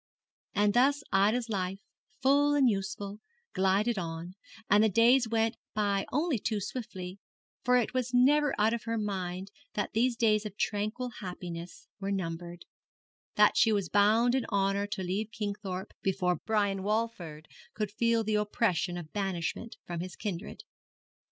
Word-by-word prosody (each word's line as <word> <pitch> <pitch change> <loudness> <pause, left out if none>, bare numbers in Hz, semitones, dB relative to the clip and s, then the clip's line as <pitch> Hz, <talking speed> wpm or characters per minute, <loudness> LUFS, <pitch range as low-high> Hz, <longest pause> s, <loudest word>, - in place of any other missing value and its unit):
And 205 0 +3
thus 280 +3 +3
Ida's 215 +5 +3
life, 190 -3 -2 0.5
full 285 +2 +4
and 275 -3 +5
useful, 200 -1 -2 0.3
glided 195 +4 +2
on, 165 +1 -5 0.3
and 205 +2 +5
the 220 - +4
days 235 +4 +4
went 225 0 +1 0.2
by 200 -2 +1
only 295 -2 +1
too 215 +1 -1
swiftly; 195 -3 -6 0.4
for 250 +1 +4
it 240 - 0
was 255 -1 -1
never 285 +4 +4
out 220 +2 +3
of 235 -1 -4
her 230 0 -1
mind 190 -2 -3 0.2
that 205 - -2
these 240 +2 +2
days 215 -2 +3
of 205 -2 -7
tranquil 215 +4 -1
happiness 175 -2 -7
were 195 0 -3
numbered, 175 -2 -4 0.7
that - - +5
she 225 - +5
was 200 -5 0
bound 220 +4 +4
in 265 -2 +1
honour 200 0 0
to 205 -2 -4
leave 195 +4 -2
Kingthorpe 200 -3 -4
before 180 -2 +1
Brian 205 -3 +1
Walford 190 -7 -2 0.3
could 210 -2 -2
feel 230 +1 +2
the 215 0 -1
oppression 210 -4 0
of 160 -3 -9
banishment 195 +2 -3
from 175 -1 -4
his 180 +1 -6
kindred. 205 - -5
205 Hz, 150 wpm, -30 LUFS, 190-230 Hz, 0.7 s, and